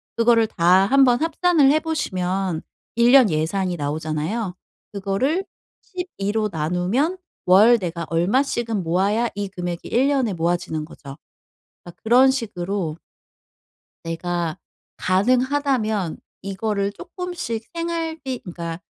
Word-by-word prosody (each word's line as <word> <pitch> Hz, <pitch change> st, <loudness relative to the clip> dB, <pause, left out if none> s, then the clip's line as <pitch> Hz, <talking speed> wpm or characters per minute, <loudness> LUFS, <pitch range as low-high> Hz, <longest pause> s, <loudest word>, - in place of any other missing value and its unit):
그거를 230 Hz, -1 st, +4 dB
다 185 Hz, 0 st, +4 dB
한번 260 Hz, -1 st, +4 dB
합산을 325 Hz, -3 st, +3 dB
해 310 Hz, -, +3 dB
보시면 190 Hz, -, -2 dB, 0.3 s
1 235 Hz, +1 st, +4 dB
년 260 Hz, -5 st, +7 dB
예산이 175 Hz, +3 st, -1 dB
나오잖아요. 155 Hz, +7 st, -3 dB, 0.4 s
그거를 210 Hz, -, -1 dB, 0.4 s
12로 220 Hz, -, -3 dB
나누면 180 Hz, -, 0 dB, 0.3 s
월 210 Hz, +6 st, +6 dB
내가 170 Hz, -3 st, -4 dB
얼마씩은 220 Hz, +4 st, 0 dB
모아야 195 Hz, +8 st, +1 dB
이 205 Hz, 0 st, -3 dB
금액이 175 Hz, -2 st, -5 dB
1 255 Hz, +4 st, +2 dB
년에 265 Hz, -7 st, +1 dB
모아지는 165 Hz, -2 st, -1 dB
거죠. 140 Hz, -3 st, -11 dB, 0.7 s
아 175 Hz, -, -9 dB
그런 250 Hz, +4 st, +6 dB
식으로 195 Hz, -, -3 dB, 1.1 s
내가 165 Hz, 0 st, -3 dB, 0.4 s
가능하다면 245 Hz, -, +1 dB, 0.2 s
이거를 200 Hz, +1 st, -2 dB
쪼끔씩 345 Hz, -, -5 dB
생활비 325 Hz, -6 st, -3 dB
그러니까 170 Hz, -2 st, -6 dB
205 Hz, 245 characters per minute, -22 LUFS, 175-260 Hz, 1.1 s, 년